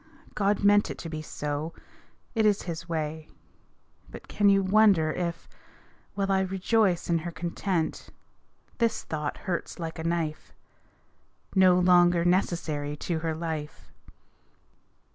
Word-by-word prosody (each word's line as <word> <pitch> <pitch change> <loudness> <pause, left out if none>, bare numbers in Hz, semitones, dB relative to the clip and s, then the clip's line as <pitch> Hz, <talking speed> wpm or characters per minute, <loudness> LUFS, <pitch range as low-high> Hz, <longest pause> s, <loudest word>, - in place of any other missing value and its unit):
God 205 0 0
meant 205 +1 +4
it - - -6
to 165 - -7
be 155 -1 -5
so 150 +1 -4 0.6
it 225 - +1
is 210 -2 +2
His 165 -1 -6
way. 155 -1 -3 0.8
But - - -11
can 205 -1 +3
you 195 0 +4
wonder 190 -5 +4
if, 170 -1 -4 0.7
while 195 -1 0
I 190 - +3
rejoice 190 0 +1
In 170 -1 +2
her 170 +2 -5
content, 170 0 -3 0.7
this 230 -1 +1
thought 150 -2 -4
hurts 180 -3 -3
like 165 -2 -6
a - - -4
knife 165 -2 -2 1.0
"No 185 -2 +5
longer 175 -1 +4
necessary 160 -5 0
to 165 +1 -2
her 160 0 -2
life!" 160 -2 -6
170 Hz, 130 wpm, -27 LUFS, 160-195 Hz, 1.0 s, No